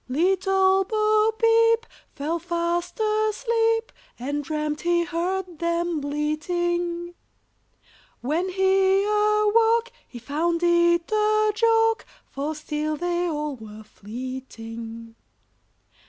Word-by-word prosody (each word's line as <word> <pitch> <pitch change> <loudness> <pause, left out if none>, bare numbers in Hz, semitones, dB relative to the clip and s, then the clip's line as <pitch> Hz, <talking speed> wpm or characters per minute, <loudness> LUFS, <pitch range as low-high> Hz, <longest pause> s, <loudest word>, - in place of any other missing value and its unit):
Little 380 +5 +2
Bo 430 +1 +2
Peep 455 0 +4 0.3
fell 310 +4 -2
fast 345 +3 -2
asleep, 450 +2 +1 0.3
And 285 +4 -3
dreamt 300 0 -3
he 345 0 +2
heard 345 +1 -3
them 340 -1 -1
bleating 345 +4 -2 1.1
When 320 +9 -1
he 385 +1 +3
awoke, 425 +3 +2 0.2
he 245 - -11
found 325 +7 -1
it 345 +1 +3
a 430 0 +2
joke, 450 0 +2 0.2
For 290 +3 -4
still 305 0 -3
they 350 +1 -1
all 300 -3 -3
were 220 -1 -11
fleeting. 230 0 -8
345 Hz, 95 wpm, -24 LUFS, 300-425 Hz, 1.1 s, Peep